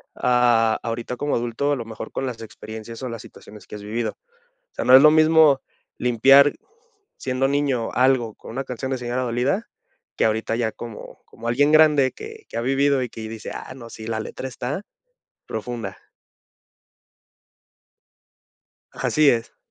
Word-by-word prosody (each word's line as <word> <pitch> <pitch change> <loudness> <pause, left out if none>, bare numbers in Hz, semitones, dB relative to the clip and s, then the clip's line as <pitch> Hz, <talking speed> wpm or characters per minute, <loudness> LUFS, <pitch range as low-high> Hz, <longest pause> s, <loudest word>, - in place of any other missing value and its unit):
a 120 -3 +3
ahorita 115 +1 -4
como 145 +2 -1
adulto, 120 +5 -1
a - - +1
lo 115 - -6
mejor 110 -1 -8
con 135 - -3
las 120 -3 -5
experiencias, 110 +1 -9
o 130 - -3
las 115 -2 -6
situaciones 105 0 -14
que - - -9
has 105 - -9
vivido. 115 +3 -3 0.5
O - - -40
sea, - - -3
no 130 - +8
es 135 - +9
lo 150 +1 +8
mismo 155 -3 +5 0.4
limpiar 135 +4 +5 0.6
siendo 130 +1 0
niño 140 -5 0
algo 125 -4 +2
con - - -12
una 135 +4 -3
canción 130 +1 -5
de 130 - 0
señora 125 +1 -2
dolida, 125 - -1 0.5
que - - +2
ahorita 110 +1 0
ya 110 -2 0
como 115 -3 -10
como 115 +1 -9
alguien 145 +5 +3
grande, 150 -4 +5
que 440 0 -10
que - - -6
ha - - 0
vivido, 135 +1 +2
y 125 - -5
que 110 -1 -8
dice: 110 -1 -7
"Ah, - - -8
no 120 -3 -11
sí 110 -1 -9
la 110 -1 -2
letra 130 - -6
está 130 - -4 0.6
profunda". 115 +1 -5 3.0
Así 155 -2 +3
es. 115 -3 -1
125 Hz, 165 wpm, -23 LUFS, 115-140 Hz, 3.0 s, es